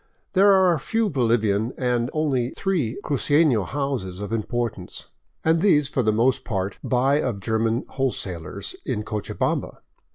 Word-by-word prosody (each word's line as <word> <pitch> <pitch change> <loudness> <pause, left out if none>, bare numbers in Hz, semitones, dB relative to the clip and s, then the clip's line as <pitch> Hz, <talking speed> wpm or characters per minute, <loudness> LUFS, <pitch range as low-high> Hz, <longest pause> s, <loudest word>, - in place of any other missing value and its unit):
There 200 +1 +6
are 185 -4 +4
few 225 +7 0
Bolivian, 115 -4 +1
and 125 -1 0
only 135 -6 0
three 165 - -1
cruceno 145 - +2
houses 135 -10 -3
of 105 +2 -5
importance, 115 -4 -4 0.3
and 160 +1 +3
these 150 -8 +3
for 135 - 0
the 110 -2 +2
most 125 +4 +2
part 95 -4 -3
buy 135 +4 +2
of 115 -6 -2
German 115 +3 0
wholesalers 95 - -3
in 105 - -2
Cochabamba. 105 -1 -3
125 Hz, 135 wpm, -24 LUFS, 110-145 Hz, 0.3 s, There